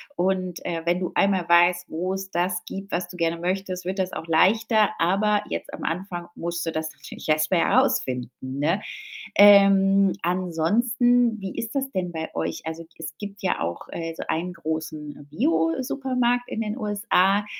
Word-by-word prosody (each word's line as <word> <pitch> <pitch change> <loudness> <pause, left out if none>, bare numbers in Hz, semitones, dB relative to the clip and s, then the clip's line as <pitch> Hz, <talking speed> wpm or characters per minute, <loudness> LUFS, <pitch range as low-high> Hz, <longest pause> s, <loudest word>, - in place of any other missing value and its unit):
und, 185 -1 -1
äh, 170 -2 -2
wenn 175 +1 +1
du 180 - -3
einmal 190 -3 +2
weißt, 175 +1 +4
wo's 190 +4 -3
das 180 +1 -1
gibt, 195 +1 -7
was 175 0 -1
du 180 0 -11
gerne 165 0 0
möchtest, 185 0 -3
wird 190 +1 -3
das 185 -1 -1
auch - - -5
leichter. 215 +6 +3
Aber 205 +4 +2
jetzt - - -4
am - - -8
Anfang 175 0 -3
musst 170 0 -4
du 165 - -1
das 160 0 -3
natürlich - - -10
erst 155 +1 +2
mal 175 - +4
rausfinden, 130 - +1
ne? 145 +9 -1 0.6
Ähm, 195 -1 +7
ansonsten, 220 +7 +2
wie 195 -1 -6
ist 230 +3 -4
das 270 0 -1
denn 180 -2 -2
bei 160 -1 -5
euch? 80 0 -2
Also, 160 +1 -5
g 165 - -22
es 155 -1 -7
gibt 200 -1 -8
ja 185 - 0
auch, 85 +1 -4
äh, 165 -1 -5
so - - -5
einen 175 +3 -2
großen 155 -3 -5
Biosupermarkt 245 - 0
in 225 - -3
den 215 +2 -3
USA. 205 -2 +2
180 Hz, 175 wpm, -24 LUFS, 165-205 Hz, 0.6 s, Ähm